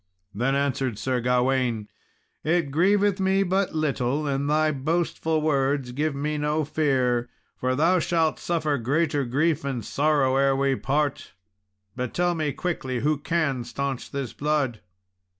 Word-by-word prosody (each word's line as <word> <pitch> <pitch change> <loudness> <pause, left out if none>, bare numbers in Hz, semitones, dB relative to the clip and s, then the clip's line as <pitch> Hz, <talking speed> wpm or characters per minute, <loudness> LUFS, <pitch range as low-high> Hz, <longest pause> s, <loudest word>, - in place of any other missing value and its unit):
Then 125 +6 0
answered 135 -4 -1
Sir 125 +4 -1
Gawain, 125 -3 +1 0.6
"It 160 -3 +1
grieveth 195 +5 +3
me 190 +1 +2
but 190 -1 0
little, 145 -2 0
and 140 0 -1
thy 155 +1 +3
boastful 160 +2 -1
words 140 -3 +1
give 145 +3 -1
me 150 +2 -2
no 150 +1 0
fear, 130 -6 +1 0.3
for 130 0 -1
thou 170 +6 +3
shalt 165 -1 +1
suffer 155 -5 0
greater 145 +3 0
grief 150 +5 +1
and 130 -6 -3
sorrow 140 -3 +2
ere 135 0 +3
we 135 0 +1
part; 145 -1 -1 0.6
but 125 -1 -4
tell 175 0 +2
me 155 -3 -1
quickly 130 -8 -3
who 150 0 +1
can 150 -5 0
staunch 140 +1 -4
this 140 -4 -4
blood." 145 -6 -1
145 Hz, 145 wpm, -25 LUFS, 130-155 Hz, 0.6 s, grieveth